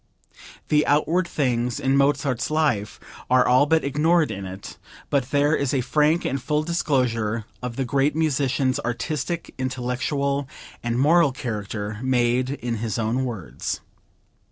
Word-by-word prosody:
The 150 Hz, 0 st, +4 dB
outward 165 Hz, +5 st, +2 dB
things 125 Hz, -6 st, -1 dB
in 135 Hz, +1 st, +1 dB
Mozart's 140 Hz, -2 st, +1 dB
life 145 Hz, -10 st, 0 dB, 0.3 s
are 125 Hz, 0 st, +5 dB
all 130 Hz, +4 st, +5 dB
but 160 Hz, +1 st, +3 dB
ignored 155 Hz, +2 st, +2 dB
in 100 Hz, -2 st, -5 dB
it, 95 Hz, +1 st, -9 dB, 0.3 s
but 140 Hz, -3 st, +1 dB
there 145 Hz, +2 st, +3 dB
is 140 Hz, -1 st, 0 dB
a 130 Hz, -, +2 dB
frank 150 Hz, +6 st, +2 dB
and 135 Hz, 0 st, -1 dB
full 150 Hz, +4 st, 0 dB
disclosure 125 Hz, -9 st, 0 dB, 0.2 s
of 125 Hz, -1 st, -5 dB
the 135 Hz, -, -1 dB
great 140 Hz, +3 st, +1 dB
musician's 135 Hz, -4 st, +1 dB
artistic, 150 Hz, +7 st, -3 dB
intellectual 130 Hz, +2 st, -1 dB, 0.3 s
and 120 Hz, 0 st, -1 dB
moral 155 Hz, +3 st, +4 dB
character, 105 Hz, -4 st, -4 dB
made 125 Hz, 0 st, +1 dB
in 120 Hz, -4 st, -3 dB
his 110 Hz, -2 st, -3 dB
own 115 Hz, +4 st, 0 dB
words. 110 Hz, -10 st, -4 dB
130 Hz, 140 wpm, -23 LUFS, 120-150 Hz, 0.3 s, are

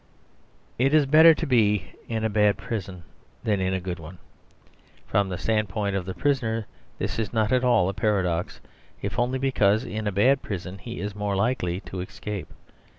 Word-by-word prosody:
It 135 Hz, +4 st, +3 dB
is 150 Hz, -2 st, +5 dB
better 160 Hz, +3 st, +7 dB
to -, -, -3 dB
be 105 Hz, -8 st, +2 dB, 0.2 s
in 110 Hz, -1 st, -2 dB
a -, -, +3 dB
bad 105 Hz, -1 st, +3 dB
prison 95 Hz, -5 st, -5 dB, 0.4 s
than 105 Hz, -3 st, +1 dB
in 95 Hz, 0 st, 0 dB
a 95 Hz, -, 0 dB
good 90 Hz, -2 st, -5 dB
one. 85 Hz, +3 st, -10 dB, 0.9 s
From 100 Hz, 0 st, +1 dB
the 90 Hz, -, -3 dB
standpoint 105 Hz, -2 st, -1 dB
of 95 Hz, -2 st, -2 dB
the 95 Hz, -, -4 dB
prisoner 115 Hz, -6 st, 0 dB, 0.3 s
this -, -, -3 dB
is 110 Hz, -3 st, -2 dB
not 110 Hz, -2 st, +1 dB
at 130 Hz, 0 st, +3 dB
all 120 Hz, -8 st, +4 dB
a 95 Hz, -, -1 dB
paradox; 95 Hz, -4 st, 0 dB, 0.4 s
if -, -, -2 dB
only 125 Hz, +2 st, +1 dB
because 110 Hz, -6 st, +2 dB
in 110 Hz, 0 st, -4 dB
a -, -, +1 dB
bad 125 Hz, +8 st, +3 dB
prison 95 Hz, -1 st, -6 dB
he 115 Hz, +5 st, -7 dB
is 105 Hz, 0 st, -4 dB
more 105 Hz, -1 st, -2 dB
likely 95 Hz, -4 st, 0 dB
to 95 Hz, -, -7 dB
escape. 100 Hz, +2 st, -6 dB
105 Hz, 185 wpm, -25 LUFS, 95-120 Hz, 0.9 s, better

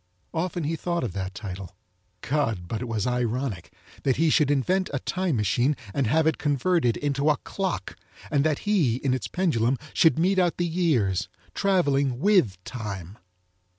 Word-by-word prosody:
Often 175 Hz, +1 st, -2 dB
he 155 Hz, +3 st, -1 dB
thought 170 Hz, 0 st, -2 dB
of 110 Hz, -8 st, -3 dB
that 95 Hz, 0 st, -4 dB
title. 95 Hz, -2 st, -7 dB, 0.4 s
God, 115 Hz, -11 st, -1 dB
but 110 Hz, +4 st, -3 dB
it 125 Hz, -, -4 dB
was 110 Hz, -3 st, -1 dB
ironic, 125 Hz, -5 st, -2 dB, 0.3 s
that 135 Hz, -3 st, +2 dB
he 160 Hz, -1 st, +2 dB
should 150 Hz, -3 st, +3 dB
invent 180 Hz, +7 st, +1 dB
a 140 Hz, -, -1 dB
time 180 Hz, +3 st, -1 dB
machine 120 Hz, +7 st, +1 dB, 0.2 s
and 135 Hz, -4 st, +1 dB
have 155 Hz, +6 st, +3 dB
it 160 Hz, -, +1 dB
converted 145 Hz, -2 st, +1 dB
into 145 Hz, +1 st, 0 dB
a 150 Hz, -, +3 dB
clock, 190 Hz, -2 st, -4 dB, 0.4 s
and 140 Hz, -2 st, +3 dB
that 155 Hz, -2 st, +1 dB
he, 170 Hz, -, +3 dB
in 130 Hz, +1 st, 0 dB
its 130 Hz, -, -2 dB
pendulum, 135 Hz, -9 st, +1 dB, 0.2 s
should 165 Hz, -2 st, +4 dB
mete 185 Hz, +4 st, +3 dB
out 175 Hz, -2 st, +2 dB
the 175 Hz, -, 0 dB
years 135 Hz, -, +1 dB, 0.2 s
traveling 140 Hz, -10 st, +2 dB
with 180 Hz, -, +3 dB
Time. 100 Hz, -5 st, -6 dB
140 Hz, 170 wpm, -26 LUFS, 115-165 Hz, 0.4 s, should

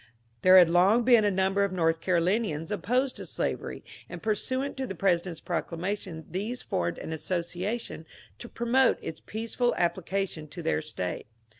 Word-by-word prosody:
There 185 Hz, 0 st, +8 dB
had 180 Hz, -2 st, +9 dB
long 185 Hz, +8 st, +4 dB
been 240 Hz, -2 st, +6 dB
a -, -, +4 dB
number 190 Hz, +1 st, +1 dB
of 200 Hz, -, 0 dB
North 165 Hz, -3 st, +1 dB
Carolinians 180 Hz, -1 st, 0 dB
opposed 250 Hz, +7 st, 0 dB
to -, -, -6 dB
slavery, -, -, -3 dB, 0.3 s
and -, -, -7 dB
pursuant 255 Hz, +6 st, -1 dB
to 265 Hz, -1 st, -2 dB
the 190 Hz, -, -5 dB
President's 175 Hz, -2 st, 0 dB
prodar 170 Hz, -1 st, -3 dB
mation 180 Hz, -2 st, -4 dB
these 215 Hz, +7 st, -4 dB
formed 85 Hz, 0 st, -2 dB
an 160 Hz, -, -5 dB
association 175 Hz, +3 st, -3 dB, 0.3 s
to 235 Hz, -, -9 dB
promote 240 Hz, +2 st, +2 dB
its 160 Hz, -, -6 dB
peaceful 230 Hz, +3 st, -1 dB
ap 175 Hz, -1 st, +2 dB
plication 185 Hz, -4 st, -3 dB
to 170 Hz, +2 st, -8 dB
their 160 Hz, -, +1 dB
State. 100 Hz, -14 st, -5 dB
190 Hz, 165 wpm, -28 LUFS, 170-225 Hz, 0.3 s, had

